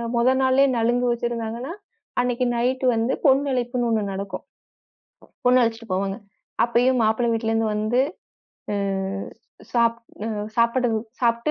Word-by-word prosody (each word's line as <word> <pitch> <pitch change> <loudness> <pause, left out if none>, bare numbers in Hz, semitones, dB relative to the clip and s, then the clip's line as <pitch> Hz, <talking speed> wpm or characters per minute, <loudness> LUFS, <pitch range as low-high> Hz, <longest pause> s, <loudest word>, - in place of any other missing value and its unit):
மொத 240 +2 +4
நாளே 260 +1 +4
நலுங்கு 240 +2 +2
வச்சிருந்தாங்கன்னா, 235 +3 -3 0.5
அன்னைக்கு 250 0 0
நைட்டு 255 +2 0
வந்து 225 +3 +1
பொண்ணு 275 +1 +4
அழைப்புன்னு 245 -1 -1
ஒண்ணு 220 -2 +1
நடக்கும். 195 -1 -5 1.0
பொண்ணு 250 0 +5
அழைச்சிட்டு 230 -1 -2
போவாங்க. 195 +1 -1 0.5
அப்பயும் 245 +2 +2
மாப்பிள்ளை 230 +2 +2
வீட்டுலருந்து 225 -1 0
வந்து, 215 +4 +1 0.7
அ - - 0 1.0
சாப் 235 -1 +2 0.3
அ - - -2 0.3
சாப்பிட 235 +2 +3 0.3
சாப்பிட்டு 235 +4 +1
235 Hz, 120 wpm, -23 LUFS, 225-250 Hz, 1.0 s, பொண்ணு